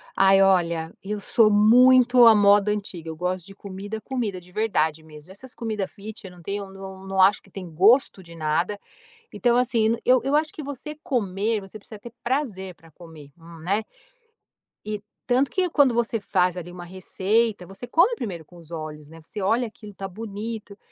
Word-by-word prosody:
Ai 195 0 +5
olha. 170 -4 +2
Eu 210 +2 -4
sou 215 +2 +3
muito 245 +4 +6
à 225 -1 +8
moda 205 0 +5
antiga. 195 -6 -5
Eu 160 - -6
gosto 180 +1 -3
de 195 - -13
comida, 200 +2 -7
comida 220 -6 -3
de 180 +1 -19
verdade 160 -7 0
mesmo. 155 +2 -14
Essas 250 +6 -10
comida 215 -5 -3
fit, 210 +3 -11
eu 190 - -9
não 180 -1 -15
tenho 200 +3 -4
eu - - -14
não 190 0 -10
não 190 0 +1
acho 200 +3 +5
que - - -21
tem 185 -1 -8
gosto 200 - +3
de 170 -1 -13
nada. 165 +6 -1 0.5
Então, 240 -1 +2
assim, 235 -2 +2
eu 255 0 +5
eu 275 +2 +2
acho 310 0 0
que 310 - -8
você 285 +2 -7
comer, 215 -2 -1
você 195 +2 -11
precisa 210 +1 -12
ter 235 +3 -11
prazer 225 -9 -2
pra 165 0 -20
comer. 160 -3 -14
Um 165 0 -13
né? 195 +7 -1 1.0
E, 210 -1 -4 0.2
tanto 260 +2 +2
que 375 -1 0
quando 280 -6 +4
você 230 -1 0
faz 185 -3 +1
ali 175 -1 -7
uma 175 0 -9
receita, 190 +3 -1
você 195 +6 -10
come 345 - +3
primeiro 180 - -6
com 175 - -17
os 165 -2 -14
olhos, 155 -2 -7
né. 165 +1 -13
Você 205 +6 -7
olha 225 +6 +1
aquilo, 210 -1 -13
tá 195 - -5
bonito. 210 +1 -7
200 Hz, 195 wpm, -24 LUFS, 180-230 Hz, 1.0 s, à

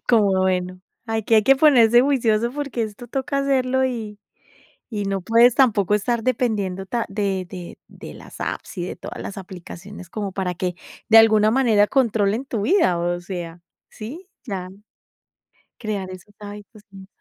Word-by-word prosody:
Como 210 -5 +4
bueno, 185 -1 -1 0.3
aquí 225 0 0
hay 215 - +6
que 270 +4 +5
ponerse 240 -6 +6
juicioso 235 -4 +1
porque 280 -5 -3
esto 215 +3 -7
toca 275 +2 -2
hacerlo 260 -1 +1
y 220 -5 -4 0.7
y 210 -3 -3
no 195 -1 -2
puedes 230 - +5
tampoco 210 -7 +3
estar 230 +3 0
dependiendo 210 -6 -1
ta 235 +4 -2
de 195 -2 -2
de 180 -2 -9
de - - -11
las - - -13
apps 190 - -5
y 175 - -2
de - - -5
todas - - -8
las 200 - -7
aplicaciones 185 0 -10
como 205 -3 -4
para 185 -1 -2
que, 180 0 -3 0.3
de 225 0 +8
alguna 215 -1 +5
manera 225 -4 +3
controlen 225 -2 +1
tu 225 -6 -3
vida, 300 - +3
o 175 +1 -1
sea, 175 -2 -7 0.3
¿sí? 300 - -9 0.2
Ya. 190 -5 -4 1.1
Crear 205 -4 -4
esos 185 +3 -12
hábitos, 205 +1 -11
sí. 195 -1 -12
215 Hz, 160 wpm, -22 LUFS, 190-240 Hz, 1.1 s, de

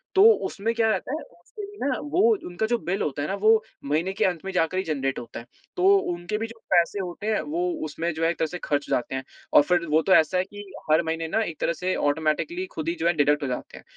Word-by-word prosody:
तो 385 - +7 0.2
उसमें 225 +3 -2
क्या 225 -1 +2
रहता 195 +4 -2
है, 305 - -3 0.2
उसपे 420 - -10
भी 410 +1 -13
ना, 265 -3 +1
वो 295 +5 0 0.3
उनका 175 +5 -2
जो 240 +1 +1
बिल 190 -3 -3
होता 145 -1 -2
है 145 - -2
ना, - - -2
वो 215 +2 +4 0.2
महीने 160 +7 0
के 215 +3 +1
अंत 180 -3 0
में 195 - -3
जाकर 180 -1 0
ही 190 - +1
जेनरेट 135 -5 -2
होता 120 - -8
है। 115 - -11 0.3
तो 380 +2 +5 0.2
उनके 175 +5 -4
भी 225 +1 -3
जो 225 0 -13
पैसे 175 +3 +3
होते 190 +3 -5
हैं, 220 -1 +1
वो 165 +4 -2 0.2
उसमें 165 +3 -3
जो 160 +1 -3
एक 170 +1 +1
तरह 160 - +1
से 180 - -6
खर्च 145 -1 -1
जाते 125 +2 -1
हैं 130 - -3 0.3
और - - +9
फिर 175 +2 +1
वो 155 +1 +4
तो 190 - +3
ऐसा 160 +2 +4
है 180 - +2
कि 205 +2 -10 0.3
हर 155 +2 +5
महीने 165 0 -2
ना, 220 +7 0
एक 165 -7 -6
तरह - - +1
से 180 +3 -2
ऑटोमैटिकली 160 - 0
खुद 160 +1 -2
ही 170 - -1
जो 165 - +1
है, 170 - +4
डिडक्ट 145 -1 +2
हो - - -1
जाते 125 -1 -5
हैं। - - -13
175 Hz, 270 wpm, -25 LUFS, 155-215 Hz, 0.3 s, और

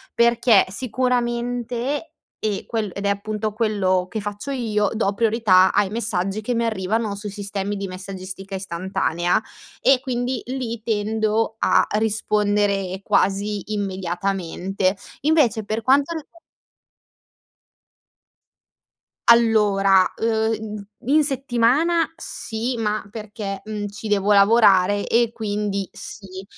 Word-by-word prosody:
Perché 235 -2 +4
sicuramente, 245 +4 -2 0.3
e 210 -2 -1
quel 220 -3 -2
ed 200 - -5
è - - +2
appunto 210 +1 -2
quello 200 -4 0
che 220 +1 -4
faccio 205 +5 -6
io, 215 -6 0
do 215 -3 0
priorità 215 -4 +4
ai 200 -2 +2
messaggi 200 -3 -1
che 220 +3 -2
mi 235 - +1
arrivano 215 0 -1
sui 205 +1 -6
sistemi 200 0 -3
di 195 -1 -4
messaggistica 190 +1 -7
istantanea 175 -2 -1 0.4
e 270 -1 +5
quindi 250 -2 -2
lì 245 -3 -4
tendo 220 0 0
a - - +4
rispondere 205 -3 0
quasi 200 +2 0
immediatamente. 190 -1 -2 0.3
Invece 260 -8 +2
per 215 +2 -2
quanto 275 +7 +3
rig 310 - -6 3.0
Allora, 205 -5 +5
uhm, 220 -2 -1 0.2
i 270 - +1
in 310 0 +5
settimana 275 +5 +2
sì 240 -6 -4
ma 215 -1 -1
perché, 210 -2 -6
mhmm, 210 -1 -4
ci 205 +2 -8
devo 205 0 +2
lavorare 200 -1 +5
e 235 -1 +2
quindi 205 -3 -2
sì; 190 -3 -9
215 Hz, 115 wpm, -22 LUFS, 195-235 Hz, 3.0 s, e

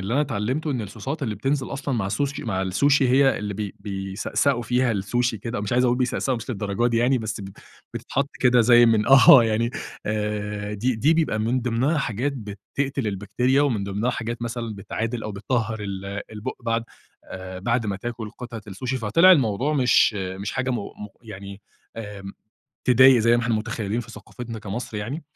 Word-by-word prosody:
اللي 100 +5 -2
أنا 145 - +3
تعلمته 130 +4 -2
إن 130 -4 -1
الـصوصات 115 +9 -6
اللي 110 -5 -1
بتنزل 135 +6 -1
أصلًا 140 -1 -3
مع 105 -5 -1
السوشي 140 +8 -2
مع 95 -5 -1
السوشي 135 +9 +3
هي 135 +2 +4
اللي 105 -1 -4
ب 105 0 -4
بيسأسأوا 100 +6 -1
فيها 125 +1 +1
السوشي 115 +3 -1
كده 115 +1 -4
مش 105 +2 -3
عايز 125 +1 +3
أقُل 125 0 +3
بيسأسأوا 125 +1 0
مش 120 +3 -7
للدرجة 105 0 -1
دي 115 -1 +1
يعني 125 +3 +3
بس 110 -2 -4
ب 95 - -7 0.5
بتتحط 140 +2 -2
كده 125 -1 +5
زي 120 +1 +6
من 110 -2 +3
آه 135 -2 +8
يعني 115 +1 0 0.4
آآ 105 -1 -3
دي 120 +5 0
دي 145 +9 +3
بيبقى 160 -9 +1
من 115 +4 0
ضمنها 125 +6 0
حاجات 130 +1 -1
بتقتل 130 +3 -4
البكتيريا 105 +7 +1
ومن 115 -9 0
ضمنها 100 +5 -1
حاجات 120 0 -4
مثلًا 115 -1 -4
بتعادل 115 +4 -4
أو 110 - -5
بتطهر 110 +2 -2 0.5
البُق 110 +4 -5
بعد، 115 0 -1 0.4
آآ، 95 0 -8
بعد 115 +4 0
ما 100 -1 -2
تاكل 115 +1 -6
قطعة 120 -1 -8
السوشي. 120 +6 -4
فطلع 145 - +5
الموضوع 130 - +2
مش 125 -4 +4
مش 95 0 -4
حاجة 130 0 -1
مُ 120 - 0
مُ 105 0 -8 1.8
تضايق 130 +1 +7
زي 115 +1 +4
ما 120 - 0
إحنا 115 -1 0
متخيلين 110 0 -2
في 120 - -10
ثقافتنا 115 0 -8
كمصر 110 +2 -5
يعني. 125 +10 -4
115 Hz, 175 wpm, -24 LUFS, 105-130 Hz, 1.8 s, آه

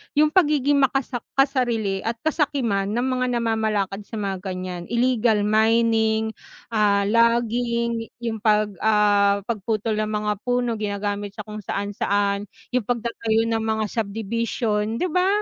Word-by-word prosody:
'yung 300 +1 +4
pagiging 290 -5 +3
makasak 270 -2 +1 0.2
kasarili 240 -8 +1
at 230 +4 -2
kasakiman 275 -11 0
ng 235 +4 -1
mga 255 -1 0
namamalakad 220 -4 0
sa 225 - -8
mga 200 -2 -2
ganiyan, 185 -2 -5
illegal 235 -3 +2
mining, 220 0 +2 0.4
ah, 205 -2 +3
logging 235 +1 +1 0.2
'yung 225 -2 -2
'pag, 210 -1 +2
ah, 205 -2 +3
pagputol 215 0 -2
ng 215 - 0
mga 210 0 -1
puno, 245 -2 0
ginagamit 205 0 -3
sa 210 - -6
kung 215 0 -8
saan, 200 0 -3
saan. 200 0 0 0.2
'Yung 250 -4 0
pagtatayo 230 -2 0
ng 225 -1 +1
mga 220 -1 0
subdivision, 220 0 -1
'di 360 +8 -1
ba? 365 +3 +2
220 Hz, 135 wpm, -23 LUFS, 205-235 Hz, 0.4 s, yung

